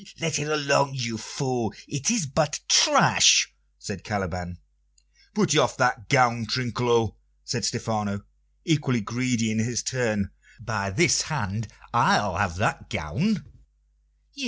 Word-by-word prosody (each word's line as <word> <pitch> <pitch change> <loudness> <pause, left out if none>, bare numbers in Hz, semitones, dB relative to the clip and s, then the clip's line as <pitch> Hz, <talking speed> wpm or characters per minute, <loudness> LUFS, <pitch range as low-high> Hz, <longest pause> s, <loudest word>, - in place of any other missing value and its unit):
"Let 160 -2 -1
it 145 - -3
alone, 140 -2 +1
you 115 -4 -4
fool; 125 -2 -3
it 145 +5 -1
is 230 -7 +1
but 150 +2 -1
trash!" - - +6 0.2
said - - -8
Caliban. 90 -3 -4 0.8
"Put - - +2
off - - +3
that 125 -5 0
gown, 120 -4 +3
Trinculo," 120 -2 0 0.3
said - - -3
Stephano, 105 -2 -3 0.4
equally 145 -7 +1
greedy 120 0 -1
in 110 - -1
his 110 -1 -1
turn. 110 -6 -1 0.3
"By 110 -4 -3
this 95 - +3
hand, 105 +2 -3 0.3
I'll 105 -4 +2
have 100 -4 -1
that - - -2
gown!" 155 - -2
115 Hz, 125 wpm, -25 LUFS, 105-135 Hz, 0.8 s, trash